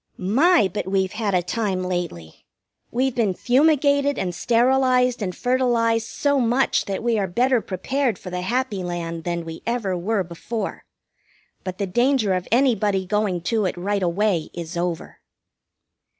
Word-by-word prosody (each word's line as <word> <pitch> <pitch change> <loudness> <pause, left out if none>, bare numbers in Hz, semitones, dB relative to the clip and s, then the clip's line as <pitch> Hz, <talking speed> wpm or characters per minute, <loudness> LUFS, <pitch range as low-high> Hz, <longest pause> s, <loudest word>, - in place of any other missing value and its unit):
My, 230 - +3
but 205 0 -4
we've 190 -1 0
had 210 -3 -1
a 180 - +2
time 190 -1 -1
lately! 175 - -5 0.5
We've 260 +2 0
been 220 -6 0
fumigated 285 - +3
and 180 -2 -2
sterilized 250 +4 +2
and 185 -3 -3
fertilized 235 -3 +1
so 285 +4 0
much 245 +2 +2
that 195 +2 -4
we 235 -2 +1
are 195 - 0
better 245 +6 +2
prepared 235 +5 -1
for 180 - -9
the 180 0 -3
happy 230 -1 -1
land 170 -2 -4
than 170 -1 -2
we 165 0 -8
ever 230 -6 -1
were 195 +3 0
before. 195 +5 -5 0.8
But 185 -1 -5
the 200 - -1
danger 240 +1 +2
of 185 -1 -2
anybody 220 -6 +2
going 195 -2 0
to 215 +4 0
it 180 - -2
right 200 +3 -1
away 180 -1 0
is 170 0 -6
over. 170 -2 -3
210 Hz, 155 wpm, -22 LUFS, 180-245 Hz, 0.8 s, My